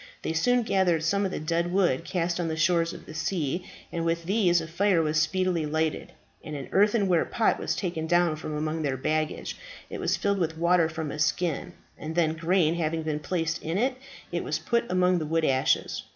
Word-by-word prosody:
They - - -1
soon 245 +9 +2
gathered 180 -6 +2
some 200 +5 +1
of 190 - -2
the - - -3
dead 170 +3 -1
wood 180 -8 +2
cast 175 -1 -1
on 170 - -1
the 160 - -2
shores 170 0 +2
of - - -10
the - - -10
sea, 170 0 -2 0.2
and 170 - -2
with 165 0 0
these 185 -3 +3
a 160 - -5
fire 185 +2 +2
was 155 -1 +2
speedily 175 -1 0
lighted, 155 +1 -1 0.3
and 155 - -6
an 140 -2 -6
earthenware 200 -3 +3
pot 230 - +1
was - - -1
taken 170 -4 -3
down 175 -1 +3
from 155 0 -5
among 155 +1 -2
their 140 -3 -1
baggage: 155 +3 -2 0.4
it - - -5
was - - 0
filled 200 -1 0
with 165 -2 -1
water 170 -1 +3
from 160 -2 -4
a 150 - -6
skin, 175 +2 0 0.3
and 160 +1 -5
then 160 -2 +2
grain 165 0 +2
having 165 -1 -1
been 155 -1 -2
placed 165 +1 -2
in 165 +3 -2
it, 255 +4 +1 0.4
it - - -2
was - - -1
put 235 -1 0
among 180 0 +3
the 155 - -3
wood 165 0 +1
ashes. 130 -2 +1
165 Hz, 210 wpm, -27 LUFS, 155-180 Hz, 0.4 s, these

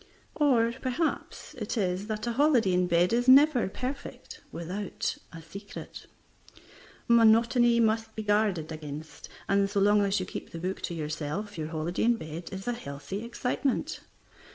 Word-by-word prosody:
Or, 240 -6 +3
perhaps, 305 +4 -2
it 215 +2 -3
is 190 0 -1
that 215 0 -3
a 240 - -1
holiday 245 -7 +3
in 180 0 +2
bed 175 +3 +3
is 245 +2 +1
never 265 -4 +6
perfect 255 +7 -6
without 185 +4 -4 0.2
a 165 -1 -10
secret. 200 +5 -10 1.0
Monotony 235 +1 +5
must 220 0 +1
be 220 - -4
guarded 205 -6 +1
against, 155 0 -8 0.2
and 200 0 +2
so 200 - 0
long 205 +1 +4
as 200 0 +1
you 185 - -3
keep - - -7
the - - -8
book 185 +3 -3
to 170 - -5
yourself 155 +6 -4
your 155 -2 -4
holiday 165 +5 -2
in 240 0 +4
bed 160 -3 -7
is 195 +2 -7
a 245 - +1
healthy 145 0 -6
excitement. 250 +5 -2
205 Hz, 155 wpm, -28 LUFS, 175-235 Hz, 1.0 s, never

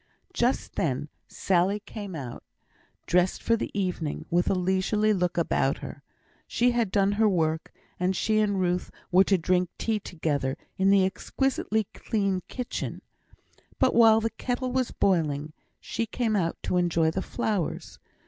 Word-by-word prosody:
Just 245 -5 0
then 145 -1 -1 0.2
Sally 190 +2 +1
came 205 -3 -8
out, 130 -5 -7 0.6
dressed 180 +1 +1
for 230 - +3
the 225 - -3
evening, 180 -5 -2
with 175 +1 +2
a - - +2
leisurely 190 +4 +1
look 180 -3 -1
about 170 - +1
her. - - -8 0.5
She 245 +1 +2
had 235 -4 +1
done 200 -1 +3
her 215 +1 +3
work, 160 -3 0 0.3
and 180 +1 +1
she 215 +3 +1
and 205 -2 +1
Ruth 180 0 0 0.2
were 185 +2 +6
to 195 - +3
drink 180 +1 +1
tea 220 -2 0
together 145 -8 -2 0.2
in 190 +1 +2
the 195 -1 +5
exquisitely 220 +2 -1
clean 195 -4 -1
kitchen; 250 -1 -5 0.7
but 260 - +3
while 225 -1 +7
the 225 0 -1
kettle 250 0 -3
was 255 -1 0
boiling, 155 -5 0 0.3
she 230 - -3
came 225 -1 -1
out 170 -4 0
to 180 - 0
enjoy 170 -2 +2
the 190 - -2
flowers. 200 -6 -3
190 Hz, 155 wpm, -27 LUFS, 175-220 Hz, 0.7 s, while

